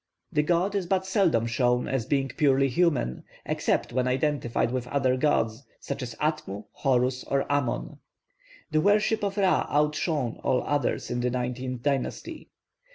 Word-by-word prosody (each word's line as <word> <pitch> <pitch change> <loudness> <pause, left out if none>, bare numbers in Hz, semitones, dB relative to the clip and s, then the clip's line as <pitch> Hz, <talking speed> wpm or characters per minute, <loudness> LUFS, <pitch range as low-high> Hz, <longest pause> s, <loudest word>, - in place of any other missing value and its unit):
The 150 - +2
god 175 +5 +1
is 195 -3 -1
but 190 0 +1
seldom 190 - +2
shown 125 +1 +1
as 125 -4 -1
being 135 -1 +1
purely 135 -1 +3
human, 130 - +1 0.2
except - - 0
when 130 0 +1
identified 130 -3 0
with 125 -1 -2
other 130 -1 +1
gods, 125 -3 +1 0.2
such - - -5
as 120 -2 -5
Atmu, 150 -10 -2
Horus, 130 -1 +1
or 140 0 +1
Amon. 145 -4 -1 0.7
The 155 0 +3
worship 210 +3 +2
of 200 0 -2
Ra 190 -2 +2
outshone 150 -3 0
all 125 - +1
others 145 -1 -1
in 120 - -1
the 125 +1 +1
nineteenth 125 0 -3
dynasty. 145 - -2
135 Hz, 155 wpm, -27 LUFS, 125-155 Hz, 0.7 s, purely